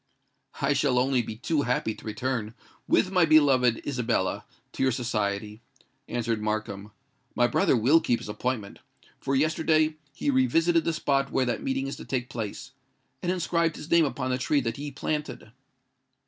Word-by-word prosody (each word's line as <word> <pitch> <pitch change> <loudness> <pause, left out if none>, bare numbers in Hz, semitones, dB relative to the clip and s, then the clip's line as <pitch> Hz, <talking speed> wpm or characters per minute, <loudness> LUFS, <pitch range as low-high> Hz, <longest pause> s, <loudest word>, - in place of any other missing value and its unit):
"I 140 +1 +2
shall 140 -3 +1
only 130 0 +2
be 110 -1 -6
too 145 +6 0
happy 125 -4 0
to - - -15
return, 110 0 -3 0.3
with 185 - +2
my 180 -2 +4
beloved 135 -7 +4
Isabella, 120 -8 -1 0.3
to - - -6
your 135 0 +3
society," 105 -3 -2 0.5
answered 115 -2 -2
Markham. 105 -1 -3 0.4
"My 120 - +4
brother 120 +1 +2
will 135 +9 +5
keep 120 - +1
his - - -9
appointment; 105 0 -3 0.4
for 135 0 -1
yesterday 155 +1 +2
he 145 +1 -1
revisited 160 +6 +3
the 165 - +1
spot 140 -3 0
where 130 - +1
that 120 - -2
meeting 135 0 -1
is 135 - -5
to - - -9
take 125 -2 -3
place, 110 -4 -5 0.5
and 180 - 0
inscribed 170 -2 0
his 155 - -10
name 170 -1 +5
upon 130 -2 -2
the 125 - 0
tree 140 +3 +1
that 115 -2 -3
he 145 +1 -5
planted." 150 -4 -4
130 Hz, 170 wpm, -27 LUFS, 115-150 Hz, 0.5 s, will